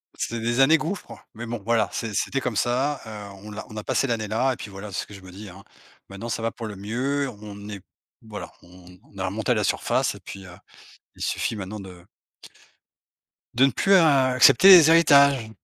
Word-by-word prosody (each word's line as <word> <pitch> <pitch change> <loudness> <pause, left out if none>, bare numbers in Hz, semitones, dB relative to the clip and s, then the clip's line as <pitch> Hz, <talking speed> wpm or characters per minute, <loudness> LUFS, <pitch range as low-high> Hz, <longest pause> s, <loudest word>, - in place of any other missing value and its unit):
C'était 115 0 -4
des 120 +2 -1
années 155 +4 +5
gouffre, 175 +6 -7
mais 115 +2 -8
bon 115 -2 -6
voilà, 115 -2 +1
c'est 110 -3 -5
c'était 135 +6 -1
comme 125 -4 -3
ça, 130 +5 0
heu, - - -9 0.3
on 105 - -10
l'a 105 - -8
«On 110 - -10
a 105 - -5
passé 135 - 0
l'année-là» 115 +3 -1
et - - -7
puis 105 - -9
voilà, 100 +1 -9
c'est - - -3
ce - - -10
que 105 - -14
je 100 - -12
me 95 -1 -13
dis, 100 +1 -10
hein, 95 +2 -14 0.5
maintenant 100 +4 -8
ça 115 - -3
va 115 0 -2
pour 115 - -8
le 105 - -8
mieux, 130 +7 -2
on 105 -1 -11
est 100 -1 -7
p - - -40 0.4
voilà, 105 -2 -9
on 90 +1 -17 0.2
on - - -17
a 95 - -2
remonté 110 +5 -1
la 105 -2 -1
surface, - - 0
et - - -12
puis, 95 -1 -11
heu, 90 0 -13 0.6
il - - -15
suffit - - -2
maintenant 100 +1 -7
de 90 -2 -12 1.5
de 130 +3 +4
ne 135 - +1
plus, 195 - +1
heu, 175 -4 +6 0.3
accepter 130 +8 +6
les 170 -4 +9
héritages. 140 -7 +5
110 Hz, 225 wpm, -24 LUFS, 100-130 Hz, 1.5 s, les